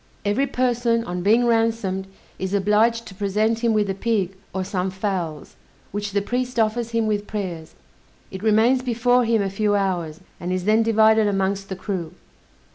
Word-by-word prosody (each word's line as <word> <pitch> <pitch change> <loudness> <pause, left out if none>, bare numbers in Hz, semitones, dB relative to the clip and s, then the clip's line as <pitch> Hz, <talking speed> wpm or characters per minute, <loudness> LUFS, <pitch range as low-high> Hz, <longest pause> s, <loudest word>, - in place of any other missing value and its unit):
Every 245 +8 +1
person 240 -3 +1
on 180 -3 -4
being 225 +6 +4
ransomed, 225 -5 0 0.3
is 190 +1 -2
obliged 215 +4 +2
to - - -10
present 210 +3 0
him 235 -1 +1
with 210 -2 +2
a 195 - -1
pig, 195 -2 -1 0.2
or 190 - -2
some 185 0 -2
fowls, 185 -6 -4 0.4
which 205 0 -4
the 200 -1 +1
priest 250 +2 -2
offers 225 +1 +1
him 230 -1 0
with 210 -1 -1
prayers; 180 -7 -5 0.6
it 190 - -7
remains 225 +4 +3
before 245 0 +2
him 225 -2 +2
a 195 - -1
few 205 +1 +1
hours, 175 -6 -1 0.2
and 175 +1 -4
is 185 -1 -2
then 215 +2 +4
divided 220 -1 +4
amongst 195 0 -1
the 190 - -3
crew. 180 -4 -4
210 Hz, 175 wpm, -22 LUFS, 190-230 Hz, 0.6 s, being